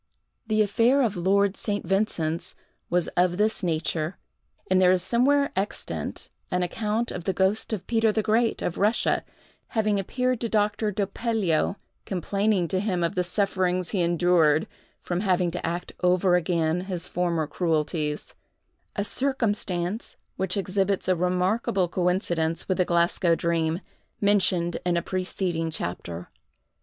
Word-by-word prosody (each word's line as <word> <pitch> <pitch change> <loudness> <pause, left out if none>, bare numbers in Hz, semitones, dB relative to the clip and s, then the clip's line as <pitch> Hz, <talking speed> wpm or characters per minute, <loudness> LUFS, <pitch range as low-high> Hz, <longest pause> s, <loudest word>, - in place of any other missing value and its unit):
The 215 -1 +3
affair 235 +7 +3
of 215 -4 0
Lord 195 +3 +2
St. 205 -2 -2
Vincent's 170 -4 -1 0.3
was 175 -1 +1
of 175 0 +1
this 215 +2 +1
nature; 165 -1 -1 0.5
and 185 0 +3
there 180 -1 +6
is 185 -1 +2
somewhere 280 +6 +2
extant, 195 +2 -3 0.2
an 180 0 0
account 215 +5 -1
of 175 - -6
the 190 - +1
ghost 190 +5 +1
of 195 -4 -3
Peter 225 -1 +2
the 220 0 0
Great, 225 +2 +1
of 175 - -2
Russia, 210 +3 +2 0.5
having 210 -2 +2
appeared 250 +5 -1
to 230 - -1
Doctor 210 0 +1
Doppelio, 200 -4 0 0.3
complaining 195 0 0
to 185 - 0
him 185 -4 0
of 170 - 0
the 180 - 0
sufferings 185 -1 0
he 195 - 0
endured 170 -3 +3 0.4
from 175 0 -2
having 185 -3 +1
to 180 - -5
act 175 +2 -3
over 180 0 +3
again 170 -1 +1
his 180 -3 -3
former 170 -3 0
cruelties; 155 -2 -1 0.6
a 205 - 0
circumstance 210 -6 -1 0.2
which 190 +1 -1
exhibits 195 0 0
a 185 - +3
remarkable 180 +2 +1
coincidence 175 -2 0
with 185 0 0
the 180 - +4
Glasgow 170 0 +2
dream, 165 +1 0 0.4
mentioned 185 -4 +2
in 175 0 +1
a 170 - -1
preceding 180 -3 -2
chapter. 90 - -5
185 Hz, 145 wpm, -26 LUFS, 175-205 Hz, 0.6 s, there